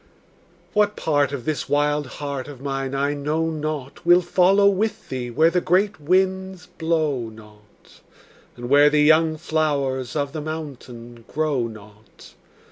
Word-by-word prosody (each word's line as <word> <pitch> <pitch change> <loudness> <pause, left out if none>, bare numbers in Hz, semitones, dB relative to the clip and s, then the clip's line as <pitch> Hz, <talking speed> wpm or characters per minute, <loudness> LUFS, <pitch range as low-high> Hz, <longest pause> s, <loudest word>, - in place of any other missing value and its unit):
What 210 -1 +2
part 145 -3 +1
of 135 -4 -5
this 155 -2 -3
wild 145 0 +1
heart 140 -1 -5
of 145 -3 -10
mine 135 0 -3
I 140 +1 0
know 155 +3 -1
not 155 -2 -5
Will 175 +1 +5
follow 185 +3 +4
with 200 +2 -1
thee 125 -2 -4
where 160 +7 +3
the 180 +1 +1
great 195 +3 +1
winds 190 +2 0
blow 155 -9 -1
not, 105 -1 -18 0.5
And 120 0 -7
where 145 +3 +6
the 150 0 +3
young 155 +1 +4
flowers 140 -5 -1
of 140 -1 -2
the 155 - -4
mountain 125 -7 -8
grow 145 -6 -1
not. 110 -1 -15
150 Hz, 145 wpm, -22 LUFS, 130-165 Hz, 0.5 s, where